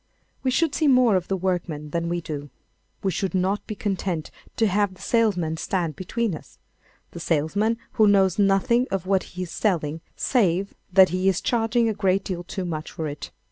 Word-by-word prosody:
We 260 - 0
should 285 +3 +1
see 310 +1 +1
more 250 -5 +5
of 180 -1 0
the 195 - -1
workman 170 -5 -2
than 170 +1 -1
we 175 0 -1
do. 145 -3 -6 0.5
We 195 - +1
should 190 +1 -2
not 190 +3 0
be 215 - -4
content 190 -6 -2 0.2
to 225 - +2
have 200 -1 +1
the - - -17
salesman 180 -9 +1
stand 170 -3 -2
between 220 +3 -2
us—the 160 +2 -14
salesman 175 +9 +1
who 215 - +4
knows 195 -2 +4
nothing 205 +5 +3
of 190 -2 -2
what 190 0 +2 0.2
he 185 - -1
is 175 - -8
selling 165 -6 -1
save 195 -6 +1 0.2
that 190 0 +7
he 185 +2 +1
is 190 - +1
charging 230 0 +1
a 220 - +1
great 195 -2 +1
deal 175 -2 -4
too 185 +1 -5
much 155 -2 -4
for 160 - -4
it. 145 0 -6
190 Hz, 190 wpm, -24 LUFS, 170-210 Hz, 0.5 s, that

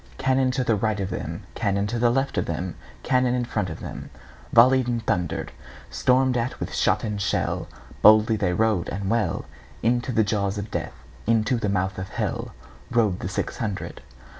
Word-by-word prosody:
Cannon 130 0 +2
to 130 0 0
right 105 0 0
of 95 -1 -2
them, 85 0 -5
Cannon 100 -2 0
to 120 +3 +1
left 135 +3 0
of - - -2
them, 85 +2 -3 0.3
Cannon 125 -1 +2
in 125 -1 0
front 90 -6 -2
of 80 - -7
themVolley'd 130 +2 +1
and 120 -2 -2
thunder'd; 90 -3 -1 0.4
Storm'd 130 0 +3
at 120 +1 -2
with - - -4
shot - - +2
and 105 -2 -2
shell, 100 - -1 0.3
Boldly 110 +1 +7
they 100 -4 0
rode 110 -2 +1
and 100 +1 -3
well, 115 -2 0 0.4
Into 120 +2 +1
the 110 -2 +3
jaws 100 -1 -1
of 100 +1 -5
Death, - - -4 0.3
Into 115 +2 +3
the 105 -3 -1
mouth 95 -1 -1
of 95 - -5
HellRode 110 -6 -2
the 95 - -4
six - - -3
hundred. 105 -5 -4
110 Hz, 170 wpm, -24 LUFS, 100-120 Hz, 0.4 s, Boldly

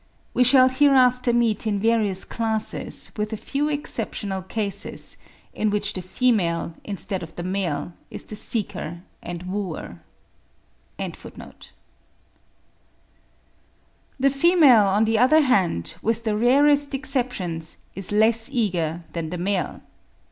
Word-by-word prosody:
We 250 - +4
shall 255 +1 +7
hereafter 255 -2 +4
meet 230 -2 +1
in 205 -2 0
various 215 -3 +1
classes, 220 -2 -2
with 210 +1 -2
a - - -3
few 285 +7 -2
exceptional 215 -9 -3
cases, 200 +1 -3 0.4
in 215 - 0
which 205 0 -1
the 185 - -4
female, 180 -5 0
instead 195 -1 -4
of 165 -2 -9
the 175 - -5
male, 180 -3 -2 0.2
is - - -6
the 215 - -7
seeker 200 -6 -2 0.2
and 175 0 -7
wooer.) 190 +1 -5 1.0
The - - -8 2.8
female, 280 - +5
on 205 +3 +3
the 220 0 +1
other 310 +6 +5
hand, 180 - +1
with 225 +1 -1
the 215 -2 0
rarest 280 +5 +3
exceptions, 245 - -3 0.2
is 195 0 -5
less 225 +3 +3
eager 175 - -1
than 165 -2 -3
the 180 - -4
male. 185 +1 -2
215 Hz, 120 wpm, -23 LUFS, 185-250 Hz, 2.8 s, shall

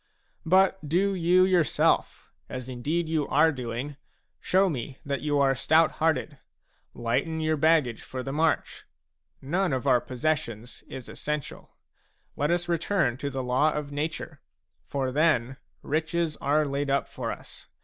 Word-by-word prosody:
But 190 -2 +3
do 195 +5 +2
you 180 0 +4
yourself, 180 -6 +1 0.2
as 125 -1 -6
indeed 145 +7 -2
you 155 -3 0
are 155 +3 +4
doing, 130 +2 -5 0.4
show 190 +1 +3
me 135 -4 -4
that 140 -1 -2
you 145 -1 0
are 135 -1 +4
stout 155 +5 +3
hearted; 155 -3 0 0.6
lighten 125 +8 -1
your 155 0 +1
baggage 155 -6 +2
for 130 -1 -6
the 135 - -4
march. 160 +2 0 0.6
None 175 +6 0
of 130 0 -2
our 125 -3 +4
possessions 125 -4 -3
is 130 -2 -8
essential. 150 -2 -5 0.6
Let 145 +1 0
us 175 0 0
return 170 -6 +1
to 140 +1 -3
the 135 -1 -3
law 130 +5 +2
of 150 -1 -4
nature; 150 +3 -4 0.5
for 135 -2 -2
then 135 -4 +2 0.3
riches 160 +1 -1
are 150 +2 +2
laid 140 0 -2
up 140 0 +1
for - - -4
us. - - -10
150 Hz, 150 wpm, -27 LUFS, 130-165 Hz, 0.6 s, you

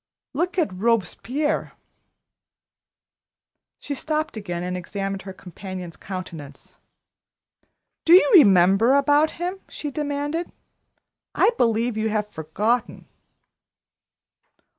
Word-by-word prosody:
Look 350 +7 -2
at 315 - +1
Robespierre 230 - -1 1.4
" - - -62
She 290 - -4
stopped 310 +1 -3
again 175 -5 -5
and 180 0 -3
examined 195 +2 -4
her 190 - -8
companion's 185 -1 -9
countenance. 165 -7 -8 1.3
"Do 330 - +5
you 370 - +6
remember 200 - +6
about 290 +2 +4
him?" 360 +3 -3
she 295 - -5
demanded. 290 +3 -3 0.8
"I - - +4
believe 230 - +1
you've 215 -1 -1
forgotten." 210 +9 -2
220 Hz, 95 wpm, -23 LUFS, 185-290 Hz, 1.4 s, you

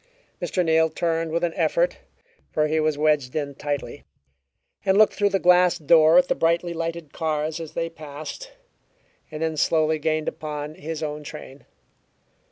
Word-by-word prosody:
Mr. 180 -2 -1
Neal 160 0 +3
turned 165 0 -1
with 170 +2 -1
an 170 -1 0
effort - - +1 0.5
(for 155 - +1
he 155 +1 0
was 155 -1 +1
wedged 150 -4 +1
in 145 -2 -2
tightly) 145 0 -5 0.8
and 190 0 +2
looked 215 0 +5
through 205 -1 +1
the 195 - +1
glass 180 -1 +4
door 160 +1 +5
at 180 0 +5
the - - +2
brightly 170 +1 0
lighted 165 -2 -5
cars 155 0 -2
as 160 -2 -8
they 165 0 -2
passed, 155 - -9 0.8
and 155 0 -5
then 160 -1 -1
slowly 155 +1 +2
gained 155 0 -1
upon, 150 -1 -5
his 160 +1 -6
own 150 0 -4
train. 145 -2 -10
160 Hz, 165 wpm, -24 LUFS, 150-170 Hz, 0.8 s, looked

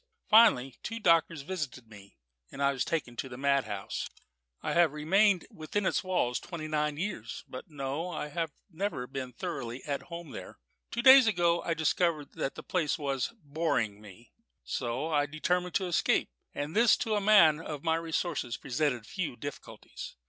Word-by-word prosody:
Finally 210 - +6
two 230 0 -5
doctors 165 -5 +3
visited 145 -8 -5
me, 100 -2 -15 0.3
and - - -10
I 140 0 +3
was 130 - -1
taken 145 -7 -2
to 130 - -4
a 125 - -7
madhouse. 135 -8 -1 0.5
"I - - -1
have 170 -4 +4
remained 185 +5 +3
within 175 +6 -3
its - - +1
walls 180 -10 0
twenty 165 -3 -6
nine 150 -1 0
years; 175 - -4
but 130 - -9
no 145 +3 -3
I 150 - -4
have 165 +1 -2 0.2
never 180 -6 -3
been 130 -1 -6
thoroughly 120 0 -5
at 140 -2 -3
home 170 -1 -7
there. - - -9 0.3
Two 235 - -3
days 260 -1 +9
ago 175 -4 +2
I 165 - -1
discovered 160 -1 +1
that 135 - -3
the - - -8
place 165 -4 0
was 135 - -2
boring 140 -9 -1
me. 105 +3 -15 0.3
So 125 +5 -2
I 145 -1 +2
determined 175 +4 -1
to 190 - +2
escape; 175 - +1 0.2
and 145 +3 -5
this 230 +1 +5
to 220 - -1
a 210 - +1
man 195 -7 +6
of 150 -3 -6
my 160 0 +2
resources 165 -6 -2
presented 125 -3 -1
few 175 - -4
difficulties. 145 +3 -8
155 Hz, 170 wpm, -30 LUFS, 135-175 Hz, 0.5 s, days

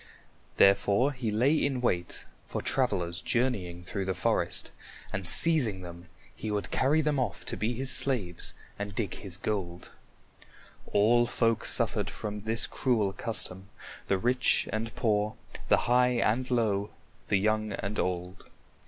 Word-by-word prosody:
Therefore 100 +6 +4
he 125 -5 -4
lay 125 +8 +2
in 140 -4 0
wait 90 -8 -2 0.2
for - - -5
travelers 95 -9 0
journeying 100 -9 -2
through 95 +2 -4
the 95 -1 -2
forest, 85 - -1 0.4
and 95 -2 -4
seizing 130 - +6
them, 85 0 -10 0.3
he 110 - -6
would 105 -1 -3
carry 145 +4 +2
them 150 -2 0
off 130 - -3
to - - -2
be 110 +6 -2
his 130 +2 -1
slaves 105 -11 +3 0.2
and 100 -1 -5
dig 100 -5 -2
his 95 -3 -7
gold. 95 -4 -4 1.0
All 120 +4 +3
folk 115 -2 0
suffered - - 0
from 105 0 -6
this 110 +2 +1
cruel 110 -7 0
custom, 95 -4 -2 0.4
the 95 - +1
rich 125 +5 +2
and 110 +1 -3
poor, 105 -2 0 0.3
the - - +4
high 125 +1 +3
and 120 +3 0
low, 105 -5 0 0.4
the 100 - +2
young 110 +1 0
and 100 +2 -4
old. 90 0 -4
110 Hz, 145 wpm, -28 LUFS, 95-125 Hz, 1.0 s, seizing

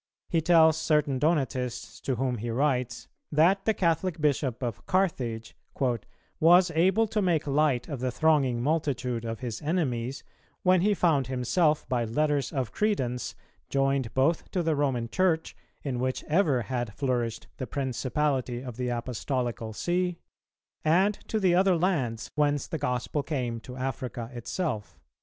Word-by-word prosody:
He 165 - +2
tells 160 -1 +5
certain 150 -4 +1
Donatists 130 -6 -1
to 130 - -1
whom 125 -1 -1
he 120 +2 -4
writes, 125 -1 0 0.2
that 175 +6 +3
the 220 - +3
Catholic 170 0 0
Bishop 140 -4 0
of 120 -4 -4
Carthage 125 -12 -1 0.8
"was 175 +2 +6
able 190 +7 +3
to 215 0 -1
make 170 -5 +1
light 140 -3 +1
of 140 -4 -5
the 130 +1 -1
thronging 130 -3 +2
multitude 130 -6 -1
of 115 +1 -4
his 120 -4 -4
enemies, 135 -6 -1 0.4
when 185 -1 +4
he 205 +2 +3
found 155 -9 +2
himself 140 +5 +1
by 125 -3 0
letters 140 +3 0
of 130 -5 -2
credence 130 - -1 0.3
joined 135 -3 +1
both 145 +5 +1
to 180 - -1
the 160 -1 +1
Roman 135 -5 0
Church, 165 +3 0 0.3
in 130 -4 -2
which 130 +1 -1
ever 150 -7 +2
had 120 -5 -3
flourished 125 -5 -1
the 130 - -4
principality 130 -1 -1
of 125 -3 -7
the 125 -1 -1
Apostolical 120 -1 -2
See, 180 +8 -1 0.7
and 185 +6 +4
to 220 - 0
the 185 -4 +3
other 185 +1 +4
lands 140 - -1
whence 145 -2 +1
the 160 - -4
gospel 130 +1 -1
came 125 -6 -3
to 125 +2 -10
Africa 125 -2 -4
itself." 120 - -4
140 Hz, 150 wpm, -28 LUFS, 125-165 Hz, 0.8 s, was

